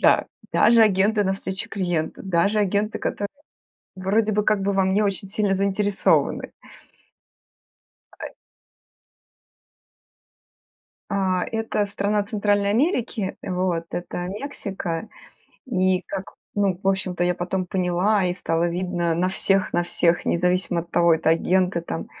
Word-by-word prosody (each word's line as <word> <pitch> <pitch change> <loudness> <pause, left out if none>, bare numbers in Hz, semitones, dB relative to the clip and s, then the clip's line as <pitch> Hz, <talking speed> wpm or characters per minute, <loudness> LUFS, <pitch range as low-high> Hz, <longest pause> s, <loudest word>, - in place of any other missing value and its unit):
Да, - - +4 0.3
даже 235 -1 +6
агенты 205 +1 +3
навстречу 190 0 -3
клиенту, 175 -5 -2
даже 195 +3 +1
агенты, 205 +1 0
которые 205 0 -2 0.7
вроде 210 +4 +1
бы, 210 +1 +1
как 210 -1 +2
бы 200 +1 0
во 195 0 +3
мне 190 +3 +2
очень 195 -1 -1
сильно 205 -1 0
заинтересованы. 200 +1 +1 1.7
А - - -7
э - - -11 2.8
А, 190 -2 +1
это 225 -2 -1
страна 205 +1 0
Центральной 205 -1 +1
Америки, 235 - 0
э, - - -5
вот. 180 -2 0
Это 175 0 -4
Мексика. 200 - -5 0.6
И 185 -5 +1
как 190 -1 -6 0.2
ну, 195 -3 +1
в 195 - -7
общем-то, 185 -2 0
я 180 0 +1
потом 180 +1 -2
поняла, 185 +2 +1
и 180 -1 0
стало 170 -1 0
видно 175 -1 -1
на 180 +2 +1
всех 195 0 0
на 175 - +2
всех, 175 0 +1
независимо 180 0 +1
от 170 - -12
того, 170 -1 +4
это 160 0 +1
агенты 180 +2 +2
там, 165 -1 -5
190 Hz, 130 wpm, -23 LUFS, 180-205 Hz, 2.8 s, даже